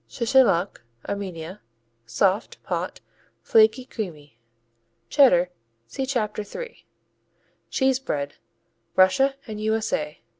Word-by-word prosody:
Chechaluk 225 - +2 0.3
Armenia 185 -2 -5 0.5
Soft; 190 - 0
pot; - - -3 0.4
flaky; 220 +3 +4
creamy. 150 - -7 0.7
Cheddar 180 -11 +5 0.3
see 265 - -4
Chapter 215 -5 -1
3. 485 - -9 0.8
Cheese 265 -1 +2
bread 145 - -3 0.6
_Russia 270 +9 +4
and 215 -2 -6
U.S.A. 215 -9 -1
210 Hz, 85 wpm, -24 LUFS, 175-255 Hz, 0.8 s, Cheddar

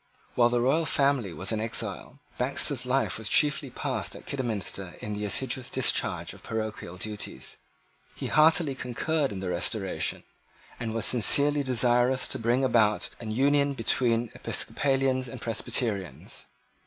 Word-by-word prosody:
While 120 -1 +4
the 120 0 +1
royal 155 +6 +2
family 140 -8 +1
was 95 +4 -2
in 110 -1 -1
exile, 110 +1 -2 0.2
Baxter's 130 0 +1
life 130 -3 0
was 110 - -3
chiefly 150 -2 +2
passed - - -3
at - - -12
Kidderminster 105 -8 -4
in 105 - -5
the 105 0 -3
assiduous 130 +4 -1
discharge - - 0
of - - -15
parochial 110 -5 -5
duties. 105 -10 -5 0.6
He - - -6
heartily 155 -1 +4
concurred 135 +4 -1
in 95 -2 -6
the 95 - -3
Restoration, 95 +2 -1 0.6
and 115 -2 -4
was 115 - +1
sincerely 145 +5 +5
desirous 125 0 +3
to - - -1
bring 120 +3 +1
about 110 -5 +2
an 115 - -7
union 140 +4 +2
between 115 -1 +1
Episcopalians 135 -2 0
and 125 +1 -8
Presbyterians. 105 - -3
120 Hz, 140 wpm, -27 LUFS, 110-135 Hz, 0.6 s, sincerely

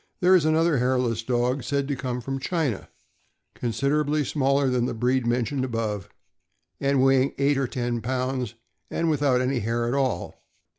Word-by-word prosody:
There 185 -1 +5
is 175 -5 +5
another 160 -2 +3
hairless 125 -2 +1
dog, 125 +3 0
said 140 -1 -1
to 140 - -1
come 125 -1 -3
from 135 +2 -4
China, 140 - -2 0.6
considerably 145 +5 0
smaller 140 0 +1
than 125 -2 +1
the - - -3
breed 125 +1 +1
mentioned 125 +3 0
above, 110 -6 -3 0.7
weighing 135 -1 +3
about - - -13
eight 140 0 +3
or 135 - 0
ten 120 -1 -2
pounds, 130 -1 -2 0.3
and 165 -1 0
without 140 -4 +2
any 130 0 0
hair 115 +2 -1
at 120 - -1
all. 130 -10 -2
130 Hz, 160 wpm, -25 LUFS, 120-140 Hz, 0.7 s, There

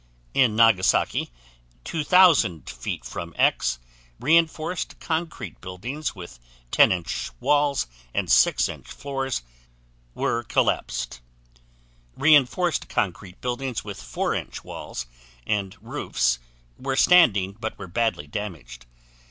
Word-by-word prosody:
In 120 -5 +3
Nagasaki, 110 -4 +3 0.5
2,000 155 - +4
feet 65 -1 -5
from 85 -1 -7
X, 60 +1 +2 0.4
reinforced 165 +3 +1
concrete 160 - -4
buildings 115 - -5
with 85 -9 -10 0.3
10" 90 -2 +4 0.3
walls 145 -1 +2 0.3
and - - -1
6" - - +4 0.2
floors 135 - -4 0.7
were 115 - 0
collapsed; - - -1 1.0
reinforced 155 +3 +3
concrete 95 -1 -3
buildings 125 0 -3
with - - -7
4" - - -2 0.2
walls 60 - -6 0.4
and 100 +1 -1
roofs 60 -1 -1 0.4
were 135 0 -2
standing 115 - +5
but 110 0 -4
were - - -7
badly 110 -3 -1
damaged. 75 - -7
115 Hz, 95 wpm, -24 LUFS, 90-145 Hz, 1.0 s, standing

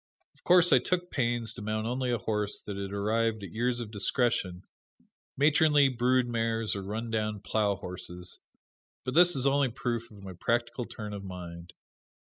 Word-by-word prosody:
Of - - -27
course 175 0 +6
I - - +7
took 180 -1 -2
pains 120 -3 0
to 120 - -9
mount 110 +1 -2
only 125 +2 -1
a 120 - +1
horse 105 -2 -1
that 100 - -6
had 100 0 -5
arrived 110 +2 0
at 95 - -7
years 120 +3 0
of 110 -3 -7
discretion, 100 -4 0 0.7
matronly 145 0 +5
brood 125 0 +2
mares 115 -2 -1
or 100 - -3
run 110 +4 -4
down 110 -1 -1
plow 105 0 0
horses; 90 -1 -5 0.7
but 130 - -2
this 175 +1 +6
is 135 -1 +1
only 140 -1 +3
proof 120 -1 -3
of 100 -2 -14
my 95 -1 -7
practical 120 +5 -1
turn 105 -2 -7
of 100 -1 -6
mind. 90 -2 -8
115 Hz, 175 wpm, -29 LUFS, 100-125 Hz, 0.7 s, I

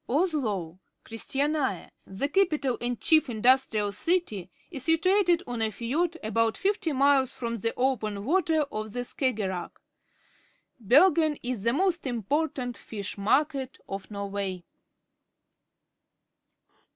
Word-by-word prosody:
Oslo 235 - -1 0.2
(Chris 225 0 -7
tiania), 280 - 0 0.2
the 195 +9 -2
capital 300 -7 +1
and 240 -1 -1
chief 310 -4 +4
industrial 225 -2 +3
city, 215 - -1 0.2
is 270 -6 -5
situated 355 +2 +3
6ii~a 225 -3 -1
fiord 310 +10 -1
about 225 +1 +1
fifty 390 -4 0
miles 275 -1 +3
from 235 -1 -3
the 230 +2 -1
open 215 -6 -1
water 325 +1 +2
of 215 0 -5
the 245 - -2
Skaggerack. 210 -9 -3 1.0
Ber 275 - +6
gen 310 -2 +1
is 245 -4 -3
the 235 +3 +1
most 350 0 0
important 250 +1 -2
fish 205 -3 -6
market 270 +6 0
of 195 0 -6
Norway. 200 -3 -4
255 Hz, 115 wpm, -27 LUFS, 215-310 Hz, 1.0 s, Ber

